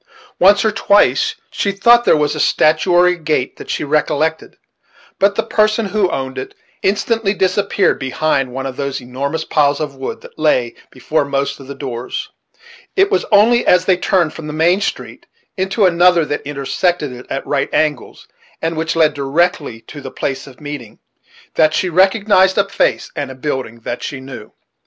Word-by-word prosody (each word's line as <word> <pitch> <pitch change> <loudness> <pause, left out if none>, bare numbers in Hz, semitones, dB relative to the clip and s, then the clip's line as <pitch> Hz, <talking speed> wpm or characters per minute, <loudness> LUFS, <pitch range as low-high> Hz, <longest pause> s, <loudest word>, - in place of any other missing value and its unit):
Once 200 +3 +5
or 220 - +3
twice 225 - +2 0.2
she 200 - -1
thought 235 +5 +4
there - - +5
was 150 -1 0
a - - -5
stature 155 +4 +2
or 175 0 +5
a 180 - +4
gait 155 -6 -2
that - - -11
she - - -2
recollected; 155 +2 -1 0.6
but 200 +1 +3
the 225 - 0
person 215 0 +1
who 205 -3 +1
owned 130 -3 -4
it 130 - -8 0.3
instantly 210 +1 0
disappeared 200 +1 +1
behind 135 0 -1
one 135 +1 -5
of 130 -2 -5
those 140 -1 -3
enormous 135 +5 -4
piles 145 -2 +2
of 150 -3 -3
wood 135 0 -6
that - - -15
lay 125 -6 +1 0.2
before 145 +4 -1
most 140 0 -2
of 135 - -12
the 140 - -7
doors, 125 -3 -5 0.7
It 390 +1 +3
was - - +1
only 225 +4 +5
as 180 0 +4
they 185 - +4
turned 175 -3 +1
from 160 - -8
the 150 - -5
main 170 +5 +2
street - - -5 0.3
into 190 +2 +1
another 175 -2 +4
that 145 - -3
intersected 145 +2 -2
it 125 0 -11
at 135 - -4
right 140 -1 -1
angles, 155 -2 -2 0.3
and 165 0 -2
which 160 +1 -2
led 155 -2 +3
directly 145 -3 -1
to 145 - -11
the 130 - -7
place 135 +1 -4
of 130 - -14
meeting, 145 -7 -8 0.6
that 155 0 +3
she 185 - 0
recognized 190 +1 +3
a 200 -1 +2
face 200 - 0
and 130 -2 -5
building 130 -5 -4
that 120 - -5
she 140 - -5
knew. 130 -5 -10
155 Hz, 180 wpm, -17 LUFS, 135-190 Hz, 0.7 s, Once